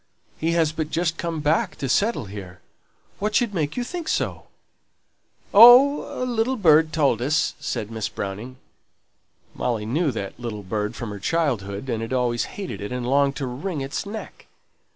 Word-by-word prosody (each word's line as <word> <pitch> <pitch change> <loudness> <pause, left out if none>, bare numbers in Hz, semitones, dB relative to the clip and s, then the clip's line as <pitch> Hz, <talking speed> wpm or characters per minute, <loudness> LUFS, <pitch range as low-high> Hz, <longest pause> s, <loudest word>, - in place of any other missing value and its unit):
He 165 +1 0
has 165 -2 +2
but 155 -1 -3
just 165 0 -1
come 165 -2 -3
back 150 +2 +1
to 135 - -4
settle 200 - +1
here. 95 -2 -9 0.6
What 210 +1 -1
should 240 -5 +2
make 155 -1 -2
you 245 - 0
think 340 +5 -6
so?" - - -2 1.1
"Oh! 250 +5 +7
a - - 0
little 245 +1 0
bird 160 -7 +4
told 140 -8 +2
us," 145 +6 +1
said 105 +1 -4
Miss 110 -1 -3
Browning. 105 +6 -6 1.0
Molly 115 -4 -2
knew 150 +8 0
that 110 -3 -5
little 110 -4 -5
bird 105 +3 -3
from 115 -4 -5
her 100 - -7
childhood, 120 -7 -1
and 115 -3 -2
had 115 +3 -4
always 120 -2 0
hated 195 - -5
it, 105 - -5
and 125 -1 -3
longed 140 +1 +2
to 140 - -3
wring 140 +6 -4
its 135 +1 -3
neck. 210 +2 -9
140 Hz, 175 wpm, -23 LUFS, 115-175 Hz, 1.1 s, Oh